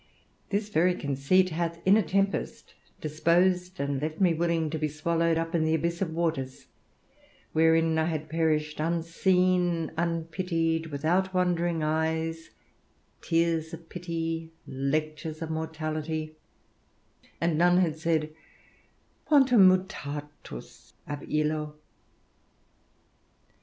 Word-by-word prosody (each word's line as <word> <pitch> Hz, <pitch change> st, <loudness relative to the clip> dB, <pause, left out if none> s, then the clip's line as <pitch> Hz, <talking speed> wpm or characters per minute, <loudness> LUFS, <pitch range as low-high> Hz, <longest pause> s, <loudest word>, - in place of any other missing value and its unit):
This 205 Hz, +1 st, -1 dB
very 180 Hz, -1 st, +3 dB
conceit 145 Hz, +7 st, +2 dB
hath 170 Hz, +1 st, -2 dB
in 190 Hz, +2 st, +6 dB
a 220 Hz, -, +5 dB
tempest 195 Hz, +2 st, -1 dB, 0.3 s
disposed 180 Hz, +4 st, +1 dB
and 140 Hz, -1 st, -1 dB
left 155 Hz, +1 st, -3 dB
me 180 Hz, -4 st, +4 dB
willing 165 Hz, -1 st, 0 dB
to 160 Hz, -, -3 dB
be 155 Hz, -, 0 dB
swallowed 165 Hz, +2 st, 0 dB
up 165 Hz, +1 st, -2 dB
in 165 Hz, -2 st, +2 dB
the 160 Hz, 0 st, +2 dB
abyss 170 Hz, +2 st, -2 dB
of 175 Hz, -4 st, -1 dB
waters, 160 Hz, -6 st, -2 dB, 0.9 s
wherein 160 Hz, 0 st, +4 dB
I 160 Hz, -, +2 dB
had 155 Hz, -2 st, -3 dB
perished 155 Hz, -1 st, 0 dB
unseen, 170 Hz, +1 st, +1 dB
unpitied, 165 Hz, 0 st, -1 dB
without 170 Hz, +6 st, 0 dB
wondering 175 Hz, -2 st, +1 dB
eyes, 160 Hz, +1 st, -1 dB, 0.7 s
tears 165 Hz, 0 st, 0 dB
of 165 Hz, 0 st, -17 dB
pity, 165 Hz, -2 st, -4 dB
lectures 155 Hz, +3 st, -2 dB
of 160 Hz, -1 st, -4 dB
mortality, 155 Hz, 0 st, -3 dB, 1.0 s
and 170 Hz, -1 st, +1 dB
none 175 Hz, +2 st, +4 dB
had 170 Hz, -4 st, +2 dB
said, 155 Hz, -1 st, -1 dB, 0.9 s
"Quantum 255 Hz, -9 st, +6 dB
mutatus 150 Hz, -, -5 dB
ab 145 Hz, -1 st, -6 dB
illo!" 150 Hz, 0 st, -1 dB
165 Hz, 110 wpm, -28 LUFS, 155-175 Hz, 1.0 s, in